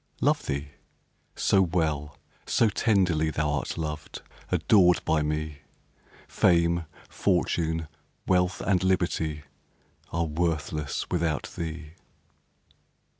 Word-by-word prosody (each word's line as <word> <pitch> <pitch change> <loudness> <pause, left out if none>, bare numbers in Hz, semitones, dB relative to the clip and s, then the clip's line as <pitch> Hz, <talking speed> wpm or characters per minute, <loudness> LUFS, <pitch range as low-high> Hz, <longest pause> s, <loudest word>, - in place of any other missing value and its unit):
Love - - +1
thee? 70 +1 -3 0.7
so 95 - +3
well, 80 -5 -1 0.3
so 115 - +3
tenderly, 90 -7 +2
Thou'rt 75 -2 -1
loved, 75 -2 -5 0.3
adored 90 -4 +4
by 80 -1 +2
me, 75 -1 -2 0.7
Fame, 85 -1 +2 0.2
fortune, 80 -4 0 0.4
wealth, 90 0 +1
and 95 -2 +1
liberty, 85 -5 0 0.7
Are 85 0 0
worthless 80 -2 -2
without 85 -4 -1
thee. 80 -1 -5
80 Hz, 90 wpm, -27 LUFS, 75-90 Hz, 0.7 s, adored